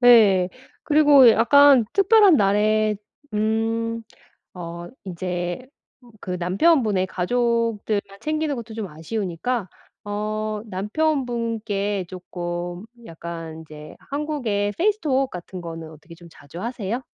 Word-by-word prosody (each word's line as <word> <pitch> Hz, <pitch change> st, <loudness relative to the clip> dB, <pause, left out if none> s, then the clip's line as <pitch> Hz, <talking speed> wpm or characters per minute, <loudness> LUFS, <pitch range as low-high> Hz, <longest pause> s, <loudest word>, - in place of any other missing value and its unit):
네. 210 Hz, -7 st, +6 dB, 0.4 s
그리고 290 Hz, -4 st, +7 dB
약간 270 Hz, +2 st, +6 dB
특별한 400 Hz, -3 st, +6 dB
날에 210 Hz, +1 st, +2 dB, 0.4 s
음 225 Hz, +1 st, -1 dB, 0.5 s
어 170 Hz, -1 st, -7 dB, 0.2 s
이제 175 Hz, +3 st, -4 dB, 0.6 s
그 185 Hz, -, -5 dB
남편분의 205 Hz, -, +2 dB
가족들만 215 Hz, -1 st, -1 dB
챙기는 310 Hz, -1 st, -1 dB
것도 230 Hz, -1 st, -8 dB
좀 220 Hz, -3 st, -4 dB
아쉬우니까 190 Hz, +6 st, -3 dB, 0.4 s
어 215 Hz, +1 st, -3 dB
남편분께 220 Hz, -, -1 dB
쪼끔 175 Hz, 0 st, -6 dB, 0.2 s
약간 165 Hz, -1 st, -7 dB
이제 150 Hz, -1 st, -11 dB, 0.2 s
한국의 255 Hz, -9 st, -1 dB
페이스톡 310 Hz, -9 st, +1 dB
같은 180 Hz, +1 st, -8 dB
거는 165 Hz, -1 st, -7 dB
어떻게 160 Hz, +2 st, -14 dB
좀 170 Hz, 0 st, -15 dB
자주 165 Hz, +5 st, -11 dB
하세요? 235 Hz, -1 st, -3 dB
210 Hz, 230 characters per minute, -23 LUFS, 180-245 Hz, 0.6 s, 그리고